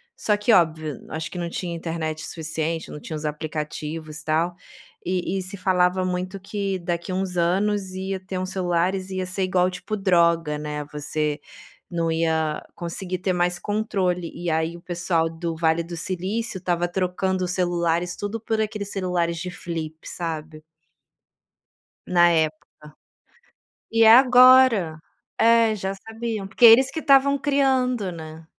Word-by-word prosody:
só 210 Hz, -, +1 dB
que 210 Hz, +3 st, +1 dB
óbvio, 155 Hz, -, +2 dB
acho 160 Hz, 0 st, -5 dB
que 180 Hz, -, -7 dB
não 170 Hz, -1 st, -3 dB
tinha 170 Hz, 0 st, -4 dB
internet 160 Hz, -2 st, -4 dB
suficiente, 160 Hz, 0 st, -3 dB
não -, -, -7 dB
tinham 155 Hz, +2 st, -7 dB
os 150 Hz, -, -6 dB
aplicativos, 155 Hz, 0 st, -4 dB
tal, 165 Hz, +3 st, 0 dB, 0.5 s
e 185 Hz, +1 st, -1 dB
e -, -, -1 dB
se 185 Hz, +2 st, -7 dB
falava 185 Hz, 0 st, +2 dB
muito 185 Hz, +2 st, -3 dB
que 195 Hz, 0 st, -3 dB
daqui 170 Hz, +1 st, -3 dB
uns 185 Hz, -1 st, -2 dB
anos 190 Hz, +2 st, +1 dB
ia 190 Hz, 0 st, -3 dB
ter 185 Hz, 0 st, -6 dB
uns 185 Hz, 0 st, -3 dB
celulares, 185 Hz, +1 st, 0 dB
ia 185 Hz, -1 st, -3 dB
ser 185 Hz, +1 st, -2 dB
igual, 185 Hz, -1 st, +2 dB
tipo, 185 Hz, +4 st, -5 dB
droga, 170 Hz, -5 st, +2 dB
né, 150 Hz, 0 st, -4 dB
você 150 Hz, 0 st, -2 dB, 0.5 s
não 170 Hz, -2 st, -1 dB
ia 160 Hz, -1 st, 0 dB
conseguir 180 Hz, 0 st, -4 dB
ter 185 Hz, 0 st, 0 dB
mais 175 Hz, 0 st, +1 dB
controle. 190 Hz, -5 st, -1 dB
E 175 Hz, -, -6 dB
aí 160 Hz, +1 st, -1 dB
o 170 Hz, -, -15 dB
pessoal 170 Hz, -2 st, 0 dB
do 165 Hz, 0 st, -4 dB
Vale 160 Hz, 0 st, +2 dB
do 170 Hz, +1 st, -7 dB
Silício 190 Hz, +4 st, -3 dB
estava 175 Hz, -1 st, 0 dB
trocando 185 Hz, +1 st, -1 dB
os -, -, -4 dB
celulares 175 Hz, -1 st, 0 dB
tudo 205 Hz, +2 st, -4 dB
por 220 Hz, 0 st, -1 dB
aqueles 210 Hz, -2 st, -3 dB
celulares 175 Hz, -3 st, -1 dB
de 180 Hz, +2 st, -4 dB
flip, 165 Hz, -3 st, -5 dB
sabe. 155 Hz, -2 st, -5 dB, 1.4 s
Na 175 Hz, -1 st, +5 dB
época. 155 Hz, -2 st, 0 dB, 1.2 s
E 225 Hz, 0 st, +4 dB
é 220 Hz, -, +9 dB
agora. 250 Hz, -9 st, +6 dB, 0.4 s
É, 230 Hz, -1 st, +5 dB
já 195 Hz, -1 st, -3 dB
sabiam, 225 Hz, 0 st, -5 dB
porque 195 Hz, -, 0 dB
eles 250 Hz, +4 st, +7 dB
que 320 Hz, -, -4 dB
estavam 280 Hz, -1 st, +4 dB
criando, 260 Hz, -7 st, +1 dB
né. 160 Hz, -1 st, -10 dB
180 Hz, 155 wpm, -23 LUFS, 165-195 Hz, 1.4 s, é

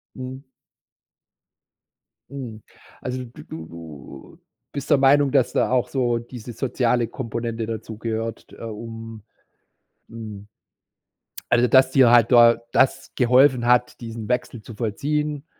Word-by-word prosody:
Mhm. 130 Hz, +1 st, -7 dB, 1.9 s
Mhm. 125 Hz, -6 st, -8 dB, 0.4 s
Also 125 Hz, 0 st, -4 dB
d 120 Hz, -, -13 dB
du 80 Hz, 0 st, -7 dB
du 80 Hz, -5 st, -12 dB, 0.3 s
bist 140 Hz, +1 st, -6 dB
der 145 Hz, -, +5 dB
Meinung, 140 Hz, 0 st, +4 dB
dass 135 Hz, -4 st, +2 dB
da -, -, +2 dB
auch 125 Hz, -2 st, +2 dB
so 120 Hz, -3 st, 0 dB
diese 120 Hz, 0 st, -9 dB
soziale 120 Hz, -1 st, 0 dB
Komponente 115 Hz, -2 st, -4 dB
dazugehört 115 Hz, 0 st, -5 dB
t -, -, -14 dB
äh, -, -, -11 dB
um, 115 Hz, 0 st, -8 dB, 0.9 s
hm 105 Hz, -3 st, -9 dB, 1.0 s
Also 120 Hz, +1 st, +4 dB
dass 130 Hz, +1 st, +5 dB
dir 130 Hz, -3 st, +5 dB
halt 120 Hz, +1 st, +5 dB
da 120 Hz, -1 st, +7 dB
das 135 Hz, 0 st, +2 dB
geholfen 125 Hz, 0 st, +4 dB
hat, 125 Hz, 0 st, +2 dB
diesen 115 Hz, -2 st, -7 dB
Wechsel 125 Hz, -2 st, -2 dB
zu 110 Hz, +1 st, -11 dB
vollziehen, 145 Hz, +7 st, -2 dB
120 Hz, 125 wpm, -23 LUFS, 115-130 Hz, 1.9 s, da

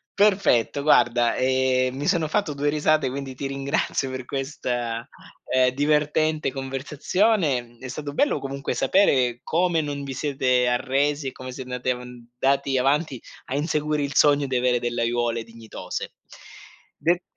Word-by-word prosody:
Perfetto 195 Hz, -, +3 dB
guarda, 120 Hz, -5 st, +4 dB
ehm, 130 Hz, 0 st, +1 dB
mi 145 Hz, +2 st, -3 dB
sono 160 Hz, -3 st, +2 dB
fatto 185 Hz, -5 st, 0 dB
due 145 Hz, +1 st, 0 dB
risate 150 Hz, -2 st, +2 dB
quindi 135 Hz, -1 st, -6 dB
ti 140 Hz, -, -4 dB
ringrazio 135 Hz, 0 st, -1 dB
per 130 Hz, -1 st, -5 dB
questa, 120 Hz, -4 st, -3 dB, 0.5 s
ehm, 130 Hz, 0 st, +5 dB
divertente 150 Hz, +1 st, +1 dB
conversazione. 145 Hz, -, 0 dB
Mhmm, 120 Hz, 0 st, -19 dB
è 130 Hz, -, -6 dB
stato 145 Hz, +2 st, -5 dB
bello 290 Hz, -, +1 dB
comunque 135 Hz, 0 st, -4 dB
sapere 130 Hz, -7 st, +2 dB
come 170 Hz, -1 st, +1 dB
non 145 Hz, -1 st, -4 dB
vi 135 Hz, -1 st, -5 dB
siete 130 Hz, -3 st, +1 dB
arresi 135 Hz, +3 st, 0 dB
e -, -, -3 dB
come 130 Hz, 0 st, -8 dB
siete 130 Hz, -1 st, -8 dB
andati 125 Hz, 0 st, -2 dB
avan 125 Hz, -1 st, -8 dB
andati 135 Hz, 0 st, +2 dB
avanti 140 Hz, 0 st, +1 dB, 0.2 s
a 130 Hz, -, -4 dB
inseguire 150 Hz, 0 st, 0 dB
il 140 Hz, +1 st, -4 dB
sogno 145 Hz, -1 st, +4 dB
di 130 Hz, -, -2 dB
avere 125 Hz, -1 st, +2 dB
delle 120 Hz, 0 st, -2 dB
aiuole 115 Hz, -1 st, 0 dB
dignitose. 115 Hz, -1 st, -7 dB, 0.8 s
De 175 Hz, +2 st, +1 dB
135 Hz, 150 wpm, -24 LUFS, 125-150 Hz, 0.8 s, ehm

